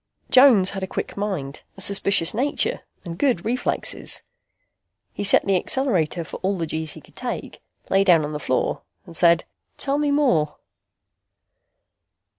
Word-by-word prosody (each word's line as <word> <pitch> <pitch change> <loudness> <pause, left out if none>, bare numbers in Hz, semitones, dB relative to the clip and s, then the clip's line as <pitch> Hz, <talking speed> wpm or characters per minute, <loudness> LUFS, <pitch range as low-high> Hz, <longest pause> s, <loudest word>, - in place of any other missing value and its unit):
Jones 255 -8 +6
had 195 -1 -5
a 190 - -3
quick - - -5
mind, 185 -9 -4 0.2
a - - -6
suspicious 195 -3 +3
nature 265 +6 0 0.3
and 170 0 -7
good 250 -11 +1
reflexes. 245 +3 -1 0.9
He - - -4
set 205 - +4
the 195 - +2
accelerator 180 - 0
for - - -8
all 190 +1 -2
the 165 - -2
G's 160 0 -4
he - - -12
could - - -22
take, - - -6 0.3
lay 195 +1 +3
down 170 -5 +4
on 150 - -6
the 150 - -4
floor 130 -3 -1 0.2
and 170 -3 -13
said, 170 +1 +4 0.3
"Tell 280 +1 0
me 295 -1 +1
more." 245 - +2
190 Hz, 155 wpm, -22 LUFS, 165-235 Hz, 0.9 s, Jones